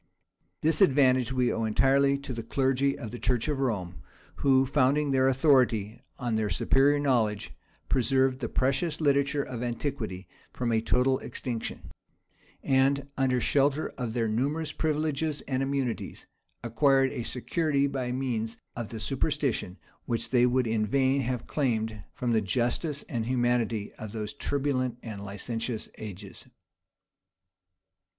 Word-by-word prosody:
This 160 Hz, +2 st, +2 dB
advantage 130 Hz, -6 st, +4 dB
we 125 Hz, -2 st, +1 dB
owe 115 Hz, -, -2 dB
entirely 135 Hz, +5 st, +3 dB
to 140 Hz, -2 st, -6 dB
the 115 Hz, -, -4 dB
clergy 135 Hz, +3 st, +1 dB
of 110 Hz, -, -7 dB
the 120 Hz, -, -7 dB
church 125 Hz, 0 st, 0 dB
of 145 Hz, -3 st, -1 dB
Rome; 95 Hz, -9 st, -2 dB, 0.4 s
who, 135 Hz, -1 st, +4 dB
founding 140 Hz, +2 st, +2 dB
their 130 Hz, 0 st, +3 dB
authority 125 Hz, -6 st, +2 dB, 0.2 s
on 120 Hz, -2 st, -2 dB
their 110 Hz, -1 st, 0 dB
superior 135 Hz, +9 st, +3 dB
knowledge, 115 Hz, -7 st, 0 dB, 0.3 s
preserved 130 Hz, +1 st, +2 dB
the 120 Hz, -, -3 dB
precious 140 Hz, +5 st, 0 dB
literature 140 Hz, -1 st, +2 dB
of 125 Hz, -3 st, -6 dB
antiquity 120 Hz, -6 st, -4 dB, 0.2 s
from 120 Hz, -2 st, -2 dB
a 110 Hz, -1 st, +2 dB
total 125 Hz, +3 st, +2 dB
extinction;[*] 120 Hz, -4 st, -5 dB, 0.7 s
and, 135 Hz, +1 st, +2 dB
under 130 Hz, -2 st, +1 dB
shelter 140 Hz, +4 st, +1 dB
of 120 Hz, -3 st, -5 dB
their 115 Hz, -2 st, 0 dB
numerous 140 Hz, +8 st, -1 dB
privileges 155 Hz, -1 st, -1 dB
and 130 Hz, -1 st, -2 dB
immunities, 135 Hz, -3 st, -3 dB, 0.4 s
acquired 135 Hz, +3 st, +3 dB
a -, -, -4 dB
security 140 Hz, +4 st, 0 dB
by 135 Hz, -3 st, -2 dB
means 120 Hz, -4 st, -2 dB, 0.2 s
of 120 Hz, -3 st, -5 dB
the 115 Hz, -, -6 dB
superstition, 130 Hz, -, -1 dB, 0.3 s
which 115 Hz, -2 st, -1 dB
they 125 Hz, -1 st, +5 dB
would 125 Hz, 0 st, +2 dB
in 110 Hz, -1 st, 0 dB
vain 135 Hz, +5 st, +2 dB
have 125 Hz, -1 st, -3 dB
claimed 110 Hz, -7 st, -1 dB
from 125 Hz, -1 st, -1 dB
the 110 Hz, -1 st, +3 dB
justice 125 Hz, -, -1 dB
and 115 Hz, -2 st, -4 dB
humanity 120 Hz, -4 st, 0 dB
of 110 Hz, -1 st, -7 dB
those 105 Hz, 0 st, -4 dB
turbulent 135 Hz, -4 st, -1 dB
and 105 Hz, -3 st, -7 dB
licentious 110 Hz, +3 st, -4 dB
ages. 100 Hz, -2 st, -8 dB
130 Hz, 140 wpm, -28 LUFS, 115-140 Hz, 0.7 s, they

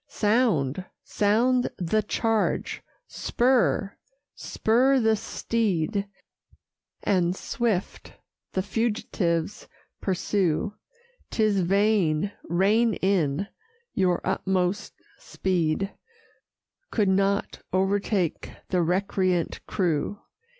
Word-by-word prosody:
Sound, 205 Hz, -, +1 dB, 0.2 s
sound 240 Hz, +5 st, +2 dB
the 190 Hz, +4 st, +1 dB
charge! 220 Hz, +1 st, -1 dB, 0.3 s
spur, 240 Hz, -5 st, +1 dB, 0.4 s
spur 260 Hz, +5 st, +2 dB
the 220 Hz, -2 st, +3 dB
steed, 205 Hz, -4 st, -1 dB, 1.0 s
And 180 Hz, -2 st, +2 dB
swift 215 Hz, -3 st, -2 dB, 0.4 s
the 190 Hz, -, 0 dB
fugitives 205 Hz, -6 st, -1 dB, 0.3 s
pursue 190 Hz, 0 st, 0 dB, 0.6 s
'Tis 215 Hz, -3 st, +2 dB
vain: 195 Hz, -2 st, +2 dB
rein 205 Hz, +6 st, +2 dB
in 185 Hz, -4 st, +1 dB, 0.5 s
your 180 Hz, -2 st, +1 dB
utmost 190 Hz, 0 st, -1 dB, 0.2 s
speed 185 Hz, +1 st, -1 dB, 1.0 s
Could 210 Hz, -3 st, +1 dB
not 195 Hz, +1 st, +1 dB
o'ertake 190 Hz, -2 st, 0 dB, 0.2 s
the 180 Hz, -2 st, +2 dB
recreant 185 Hz, 0 st, 0 dB
crew. 175 Hz, 0 st, 0 dB
195 Hz, 75 wpm, -26 LUFS, 180-215 Hz, 1.0 s, the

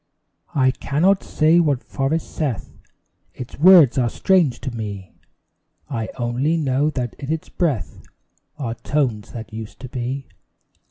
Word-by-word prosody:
I 130 Hz, -2 st, +4 dB
cannot 160 Hz, +9 st, +1 dB
say 160 Hz, +2 st, +3 dB
what 145 Hz, -6 st, +1 dB
forest 145 Hz, +4 st, -2 dB
saith 140 Hz, -10 st, -3 dB, 0.6 s
Its 125 Hz, +1 st, -9 dB
words 165 Hz, -6 st, +7 dB
are 120 Hz, -2 st, +2 dB
strange 160 Hz, -, +2 dB
to 130 Hz, -3 st, -5 dB
me: 100 Hz, -4 st, -6 dB, 0.8 s
I 115 Hz, -4 st, -2 dB
only 130 Hz, +7 st, 0 dB
know 145 Hz, -1 st, +1 dB
that 125 Hz, -6 st, -3 dB
in 140 Hz, +1 st, -4 dB
its 160 Hz, -1 st, -3 dB
breath 135 Hz, -, -2 dB, 0.6 s
Are 125 Hz, -6 st, -3 dB
tones 120 Hz, -5 st, -1 dB
that 115 Hz, -1 st, -8 dB
used 110 Hz, -1 st, -8 dB
to 130 Hz, -, -7 dB
be. 130 Hz, +2 st, -4 dB
135 Hz, 140 wpm, -21 LUFS, 120-155 Hz, 0.8 s, words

